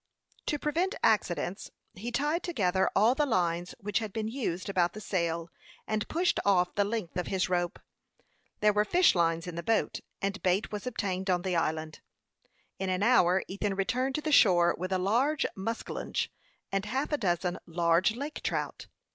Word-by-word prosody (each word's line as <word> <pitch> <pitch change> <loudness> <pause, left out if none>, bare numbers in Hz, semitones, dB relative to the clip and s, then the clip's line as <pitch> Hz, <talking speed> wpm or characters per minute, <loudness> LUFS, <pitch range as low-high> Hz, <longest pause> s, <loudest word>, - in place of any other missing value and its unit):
To 295 - +1
prevent 330 +7 0
accidents, 190 -2 +1 0.2
he 230 +6 -6
tied 295 +7 0
together 190 - +1
all 220 +5 +5
the 290 +2 +1
lines 175 -5 0
which 205 +2 -1
had 220 -3 -5
been 215 +1 -3
used 220 -8 -3
about 180 -3 +1
the 215 - -7
sail, 170 -4 -2 0.3
and 215 -1 -2
pushed 350 +2 +1
off 180 -3 +3
the 205 - +2
length 205 -5 -3
of 180 - -2
his 190 -1 0
rope. 175 -1 0 0.8
There 210 0 +5
were 210 0 +3
fish 350 +11 +4
lines 165 -1 +1
in 180 - -6
the 170 - -4
boat, 225 +3 0 0.2
and 200 +1 -2
bait 185 +3 +1
was 210 +3 -5
obtained 190 -5 -2
on 180 -1 +2
the 185 -2 -1
island. 155 -1 -1 0.8
In 190 0 -2
an 185 +1 0
hour 190 -6 +4
Ethan 200 +1 -2
returned 250 +7 0
to 305 - -1
the 310 - -2
shore 175 -10 +6
with 185 +2 -5
a 190 - +2
large 245 +11 +1
muskellunge 225 +4 -3 0.4
and 195 0 -1
half 265 +8 -2
a 295 - +2
dozen 180 -2 0
large 170 +4 +2
lake 285 +5 -5
trout. - - -3
195 Hz, 180 wpm, -29 LUFS, 180-230 Hz, 0.8 s, shore